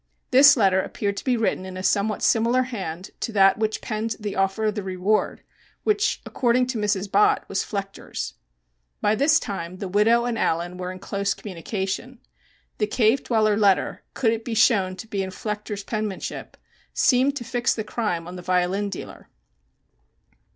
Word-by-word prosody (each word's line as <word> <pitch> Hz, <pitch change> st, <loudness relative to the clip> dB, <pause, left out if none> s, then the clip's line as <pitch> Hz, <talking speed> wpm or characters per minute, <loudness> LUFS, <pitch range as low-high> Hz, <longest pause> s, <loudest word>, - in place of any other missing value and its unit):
This 280 Hz, +2 st, +8 dB
letter 190 Hz, -4 st, +4 dB
appeared 200 Hz, +1 st, -3 dB
to -, -, -5 dB
be 255 Hz, -2 st, +1 dB
written 220 Hz, -4 st, 0 dB
in 185 Hz, 0 st, -7 dB
a 185 Hz, -, -5 dB
somewhat 205 Hz, +2 st, +1 dB
similar 235 Hz, +3 st, +3 dB
hand 190 Hz, -8 st, -6 dB
to -, -, -3 dB
that 195 Hz, 0 st, +5 dB
which 220 Hz, 0 st, -1 dB
penned 220 Hz, +1 st, -3 dB
the 210 Hz, -2 st, -4 dB
offer 195 Hz, +3 st, 0 dB
of 215 Hz, -, +1 dB
the 210 Hz, -, -3 dB
reward, 190 Hz, +2 st, -1 dB, 0.4 s
which, 420 Hz, -1 st, +1 dB
according 250 Hz, 0 st, +2 dB
to 245 Hz, -3 st, -2 dB
Mrs. 205 Hz, -2 st, -1 dB
Bott, 205 Hz, +1 st, +3 dB
was 195 Hz, -, -1 dB
Flechter's. 195 Hz, -1 st, -5 dB, 0.7 s
By 210 Hz, -, +2 dB
this 290 Hz, +7 st, +4 dB
time 185 Hz, -4 st, -5 dB
the 195 Hz, -, -5 dB
widow 220 Hz, +5 st, +3 dB
and 235 Hz, -2 st, -2 dB
Allen, 175 Hz, +2 st, -1 dB
were 180 Hz, 0 st, -4 dB
in 185 Hz, -, -8 dB
close 200 Hz, +1 st, -2 dB
communication. 195 Hz, +6 st, -5 dB, 0.6 s
The 210 Hz, -, +1 dB
"Cave 230 Hz, +3 st, +2 dB
Dweller" 215 Hz, -3 st, +2 dB
letter, 200 Hz, -3 st, +2 dB
could 230 Hz, -4 st, +2 dB
it 225 Hz, 0 st, -4 dB
be 230 Hz, -1 st, -4 dB
shown 200 Hz, -5 st, +3 dB
to 220 Hz, -, -9 dB
be 200 Hz, -2 st, -2 dB
in 190 Hz, -, -3 dB
Flechter's 210 Hz, +1 st, -5 dB
penmanship, 215 Hz, -2 st, -5 dB, 0.4 s
seemed 260 Hz, +2 st, +3 dB
to 260 Hz, -, -4 dB
fix 240 Hz, 0 st, 0 dB
the 220 Hz, -, -3 dB
crime 210 Hz, -6 st, -2 dB
on 180 Hz, -, -8 dB
the 180 Hz, -, -7 dB
violin 185 Hz, +3 st, 0 dB
dealer. 195 Hz, -, -9 dB
210 Hz, 175 wpm, -24 LUFS, 190-230 Hz, 0.7 s, This